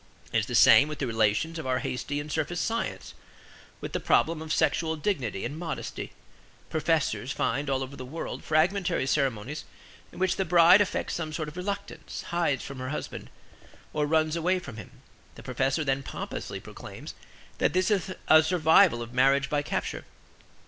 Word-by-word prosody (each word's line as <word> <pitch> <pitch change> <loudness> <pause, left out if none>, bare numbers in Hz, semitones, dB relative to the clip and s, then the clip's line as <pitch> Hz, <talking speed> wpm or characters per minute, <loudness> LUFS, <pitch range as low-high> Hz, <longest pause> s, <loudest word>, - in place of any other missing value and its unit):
It - - +4
is - - -2
the - - -3
same 145 - +7
with 150 -1 -5
the 140 - -2
relations 115 +8 +1
of 155 - -5
our 130 0 +1
hasty 130 +3 -3
and 150 +1 -6
surface 160 +3 -1
science, 230 +1 -3 0.7
with - - -6
the - - 0
problem 160 -1 +2
of 160 -1 -6
sexual 160 0 +1
dignity 140 - -2
and 145 +6 -5
modesty. 170 -2 -5 0.6
Professors 155 -4 0
find 140 +1 -1
all 135 -1 0
over 135 +2 -8
the 130 - -7
world 150 +6 -6
fragmentary 175 +1 +1
ceremonies 135 -1 -1 0.5
in - - -14
which 185 -1 +1
the 190 - +1
bride 175 +2 +7
affects 205 - -1
some 160 -2 -3
sort 155 -1 -3
of 150 - -14
reluctance, 200 +2 -5
hides 170 -6 0
from 140 -2 -8
her 130 0 -4
husband, 150 - -6 0.6
or 150 -1 0
runs 155 +1 +2
away 175 +3 +1
from 140 -11 -8
him. 115 - -9 0.5
The - - -12
professor 135 +4 0
then 135 -1 0
pompously - - -6
proclaims - - -10 0.5
that - - +2
this 185 +3 +2
is 190 -2 0 0.2
a 155 0 +8
survival 160 -5 +4
of 120 +1 -10
Marriage 135 +1 +3
by 145 -1 +2
Capture. - - -3
155 Hz, 175 wpm, -27 LUFS, 135-170 Hz, 0.7 s, a